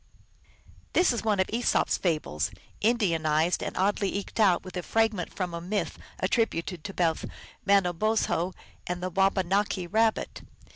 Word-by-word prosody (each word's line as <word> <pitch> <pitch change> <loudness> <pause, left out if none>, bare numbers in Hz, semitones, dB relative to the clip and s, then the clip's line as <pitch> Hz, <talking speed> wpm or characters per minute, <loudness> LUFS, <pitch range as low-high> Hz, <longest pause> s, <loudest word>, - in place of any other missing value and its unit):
This 355 -7 +4
is 235 - -3
one 210 -3 +1
of 190 - +2
Esop 240 +1 +2
s - - +1
fables 150 - -1 0.3
Indianized 170 -7 +2
and - - -4
oddly 200 +1 +1
eked 200 +3 -5
out 190 -5 +4
with 185 -1 -10
a 180 - -1
fragment 220 -3 0
from 180 -3 -3
a 170 - -4
myth 200 +4 -2 0.2
attributed 180 -7 0
to 200 - -4
both 165 -3 +1 0.4
Manobozho 190 -1 +2 0.3
and 180 0 -3
the 185 - -2
Wabanaki 195 0 +1
Kabbit. 220 +3 +1
190 Hz, 145 wpm, -28 LUFS, 175-215 Hz, 0.4 s, This